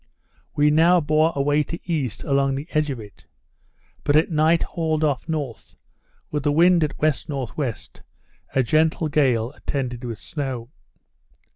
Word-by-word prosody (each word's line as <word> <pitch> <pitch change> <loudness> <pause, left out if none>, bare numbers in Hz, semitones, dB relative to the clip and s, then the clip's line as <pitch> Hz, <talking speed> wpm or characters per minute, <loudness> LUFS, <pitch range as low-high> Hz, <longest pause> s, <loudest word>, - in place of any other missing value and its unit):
We 150 0 +4
now 170 +4 +5
bore 155 +1 +2
away 145 +2 +2
to 170 +4 -5
east 145 - -3
along 135 -1 +1
the 140 +2 -5
edge 155 -1 +1
of 130 -4 -4
it; 105 -3 -13 0.8
but 145 - +2
at 155 +3 +3
night 160 +1 +3
hauled 160 -2 -1
off 145 -1 -1
north, 145 -9 -4 0.6
with 150 - -1
the 145 +1 +1
wind 170 +2 +4
at 150 - -2
W.N.W., 140 -3 -1 0.8
a 135 - +4
gentle 155 +4 +1
gale, 125 -6 +2
attended 130 -5 -4
with 115 -3 -5
snow. 130 -4 -5
145 Hz, 145 wpm, -23 LUFS, 135-155 Hz, 0.8 s, now